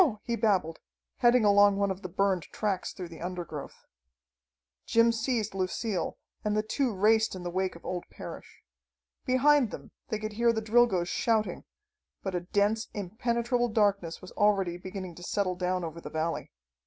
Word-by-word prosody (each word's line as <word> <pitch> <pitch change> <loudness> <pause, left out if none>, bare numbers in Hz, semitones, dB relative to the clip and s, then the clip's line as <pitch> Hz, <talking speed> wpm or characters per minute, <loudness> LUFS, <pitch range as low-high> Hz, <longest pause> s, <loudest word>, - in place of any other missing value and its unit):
he 235 - -1
babbled, 195 -8 +1 0.4
heading 240 -2 +5
along 205 0 +6
one 200 -1 +1
of 190 +1 -5
the 185 - -6
burned 190 0 +1
tracks 200 -4 -1
through 180 - -7
the 165 -1 -11
undergrowth. 175 -5 -6 1.0
Jim 230 0 +5
seized 225 -2 -1
Lucille 190 0 -2 0.3
and 210 0 0
the 215 - +2
two 255 +3 0
raced 220 +2 +3
in 185 - -7
the 175 - -3
wake 185 0 -1
of 170 - -14
old 180 -1 -3
Parrish. - - -10 0.6
Behind 260 0 +4
them - - -9 0.2
they 215 - -1
could 215 0 -5
hear 235 +2 +3
the 225 - -1
Drilgoes 220 -5 +3
shouting, 220 +2 0 0.6
but 195 - -3
a 180 - +1
dense, 205 +5 +1
impenetrable 235 +4 0
darkness 200 -7 +1
was 185 - -9
already 195 -4 +2
beginning 185 0 -7
to 175 - -12
settle 185 0 0
down 180 0 -1
over 165 0 -6
the - - -7
valley. 160 +1 -2
200 Hz, 165 wpm, -29 LUFS, 180-225 Hz, 1.0 s, along